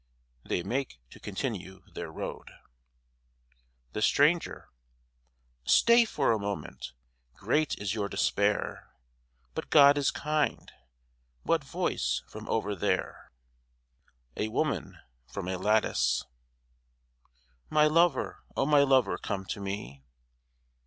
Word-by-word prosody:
(They 90 - -2
make 125 - -3
to - - -13
continue 95 -3 -5
their - - -6
road) - - -6 1.4
THE 105 - -3
STRANGER 155 +9 +2 0.9
Stay 235 - +5
for 145 - +1
a 110 - +1
moment. 100 -10 -5 0.4
Great 150 +9 0
is 100 -1 -2
your 105 -3 -2
despair, 100 +1 -1 0.6
But - - -5
God 145 -1 +7
is 140 - +2
kind. 150 0 -1 0.7
What - - +1
voice 65 0 -1
from - - -10
over 105 -2 0
there? 90 - -2 1.0
A 110 - -1
WOMAN 115 - -2 0.3
(from 90 +8 -6
a 95 - -1
lattice) 105 +3 +2 1.5
My 150 - +4
lover, 165 +3 +2
O - - +2
my 145 0 +5
lover, 135 -3 +3
come 95 -1 -4
to 100 - -5
me! 95 -10 -6
110 Hz, 110 wpm, -29 LUFS, 95-145 Hz, 1.5 s, God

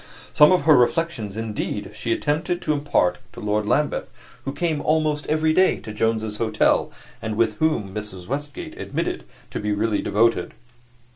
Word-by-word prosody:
Some 150 +2 +7
of 180 -5 +3
her 155 0 +6
reflections, 125 - +1
indeed, 105 -2 -3
she 115 - -4
attempted 160 +7 0
to 155 - +1
impart 145 -11 +1
to - - -10
Lord 105 0 -1
Lambeth, 150 +7 0 0.3
who 135 - -2
came 155 0 -1
almost 155 -1 +1
every 155 0 +2
day 185 +3 +4
to 110 - -8
Jones's 110 -1 -1
Hotel, 115 0 +2 0.3
and 110 -1 -3
whom 115 -2 +1
Mrs. 105 -4 -6
Westgate 145 +4 -5
admitted - - -3 0.3
to - - -3
be 105 0 -2
really 105 +1 0
devoted. 110 -4 +1
115 Hz, 155 wpm, -23 LUFS, 105-155 Hz, 0.3 s, Some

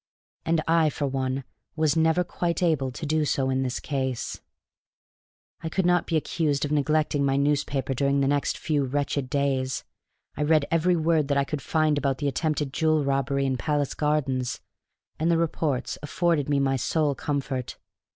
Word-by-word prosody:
And 160 -1 +1
I, 165 -1 +4
for 145 - -3
one, 135 0 -2 0.3
was 155 -2 +2
never 160 +2 +3
quite 175 0 -2
able 150 -6 +2
to 140 - -6
do 155 +1 +1
so 135 -2 0
in 130 0 +1
this 125 -1 -2
case. 130 -4 -3 1.2
I 165 - -3
could 190 +2 0
not 175 -1 +2
be 165 - +1
accused 150 -2 0
of 145 - -4
neglecting 150 0 +1
my 135 -1 +2
newspaper 140 -1 0
during 140 +2 +1
the 135 - +2
next 145 0 0
few 150 -3 0
wretched 140 0 -1
days. 135 -1 0 0.5
I 150 - -4
read 150 -1 +3
every 165 +2 +3
word 160 -2 +2
that 140 -1 +1
I 140 - +3
could 145 +1 -4
find 155 -1 +1
about 135 -2 0
the 145 - -2
attempted 150 -1 -1
jewel 155 -2 +2
robbery 140 0 0
in 130 -1 0
Palace 145 +1 -1
Gardens, 135 -5 -1 0.6
and 160 +2 +1
the 170 - +3
reports 155 -5 -1
afforded 150 -1 0
me 145 -1 +2
my 135 -1 +1
sole 145 +5 +1
comfort. 135 -3 -3
145 Hz, 175 wpm, -26 LUFS, 135-155 Hz, 1.2 s, I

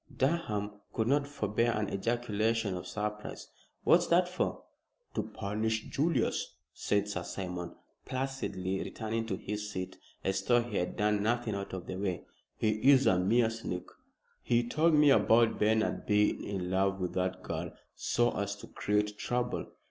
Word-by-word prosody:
Durham 105 -9 0
could 110 -1 0
not 140 +2 +2
forbear 115 -3 0
an 105 -2 -1
ejaculation 110 -1 0
of 90 0 -6
surprise, 105 +3 -4 0.3
"What's - - +5
that 175 +1 +4
for?" 180 +1 -2 0.5
"To - - 0
punish 110 +1 -2
Julius," 155 - 0 0.2
said 105 0 0
Sir 100 -3 -3
Simon, 90 -1 -5 0.3
placidly 130 -8 -2
returning 115 +1 -3
to 100 - -1
his 105 +1 -4
seat, 95 -3 -5 0.2
as 95 0 0
though 120 +4 +3
he 115 -4 -4
had 90 - -1
done 105 0 +2
nothing 120 +1 0
out 100 -1 -4
of 90 -1 -5
the 95 - -5
way. 95 -3 -2 0.3
"He 110 - +2 0.2
is 135 -1 +5
a 90 - +4
mean 110 +5 +3
sneak. 100 -5 -4 0.6
He 120 0 +2
told 155 +5 +3
me 150 -1 +6
about 115 0 +4
Bernard 110 +1 +1
being 105 0 +3
in 95 -3 -3
love 95 +1 +2
with 90 -1 -2
that 90 0 -1
girl - - -4 0.2
so 120 0 +1
as 100 0 -2
to 100 - -11
create 105 0 0
trouble." 125 0 -1
105 Hz, 160 wpm, -31 LUFS, 100-120 Hz, 0.6 s, me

